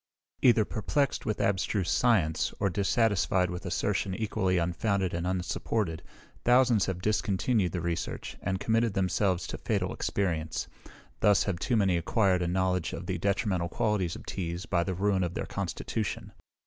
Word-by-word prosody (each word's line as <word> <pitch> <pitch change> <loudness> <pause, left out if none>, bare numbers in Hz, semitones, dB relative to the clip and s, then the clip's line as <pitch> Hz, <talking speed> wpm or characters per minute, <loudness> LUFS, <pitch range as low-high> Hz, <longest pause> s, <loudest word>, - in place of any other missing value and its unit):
Either 115 -4 +5
perplexed 135 +6 -1
with 110 - -1
abstruse 95 -1 0
science, 100 -11 +2
or 100 - +1
dissatisfied 95 -2 +2
with 90 0 -5
assertion 95 -2 -1
equally 100 -4 0
unfounded 95 +2 0
and 85 +1 -2
unsupported, 90 -1 -1 0.4
thousands 125 -4 +4
have 90 -1 -3
discontinued 105 -1 +1
the 90 - -3
research, 85 -1 -3
and 95 -1 -1
committed 115 0 +1
themselves 95 -1 +1
to - - -6
fatal - - -1
experience. 80 -5 -2 0.5
Thus 105 -1 +4
have 95 -4 -2
too 120 - 0
many 95 -4 +3
acquired 95 +1 +2
a 85 - 0
knowledge 90 -1 0
of 85 - -6
the 90 -1 -2
detrimental 95 -2 0
qualities 105 -4 0
of - - -10
teas, 85 0 -4
by 85 -2 +1
the 95 0 -3
ruin 95 0 +1
of 90 -1 -3
their - - -2
constitution. - - -4
95 Hz, 155 wpm, -29 LUFS, 90-105 Hz, 0.5 s, Either